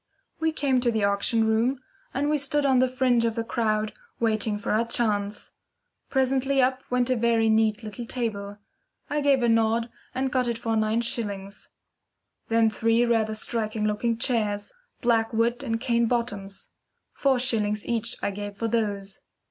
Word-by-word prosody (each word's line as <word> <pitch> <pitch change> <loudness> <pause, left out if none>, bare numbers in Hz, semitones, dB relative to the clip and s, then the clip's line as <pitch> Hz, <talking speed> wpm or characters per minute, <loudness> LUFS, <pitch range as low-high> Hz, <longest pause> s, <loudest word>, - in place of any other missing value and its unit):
We 320 0 +1
came 280 -4 +1
to 245 - +2
the 220 -2 0
auction 200 +3 +2
rooms 230 +4 +1 0.3
and 280 +3 -1
we 300 0 +2
stood 285 +1 0
on 265 -2 +4
the 255 - +4
fringe 255 -2 +2
of 230 -1 0
the 230 - -1
crowd 215 -2 -1 0.3
waiting 220 -2 +1
for 205 - -3
our 220 +2 +3
chance. 210 -3 -1 0.6
Presently 265 +1 +1
up 260 0 +2
went 250 0 +1
a - - +3
very 230 -1 +2
neat 220 0 +2
little 225 +2 -7
table. 205 -5 -3 0.5
I 295 0 +1
gave 275 -3 +3
a - - +3
nod 230 +1 +2 0.2
and 265 0 -1
got 250 -1 +1
it 235 -1 -1
for 225 -1 -1
nine 220 +1 +1
shillings. 205 -4 -4 0.8
Then 225 0 +3
three 230 +2 +2
rather 220 -2 +1
striking 215 -1 -2
looking 225 +2 0
chairs, 210 -4 -1 0.3
black 230 -2 +2
wood 235 +2 +1
and 225 -4 -2
cane 235 -1 +1
bottoms. 200 -5 -3 0.4
Four 270 -2 +2
shillings 215 -4 0
each 235 +1 -2
I - - 0
gave 205 0 -6
for 230 +3 -2
those. 205 -4 -2
230 Hz, 170 wpm, -26 LUFS, 215-250 Hz, 0.8 s, on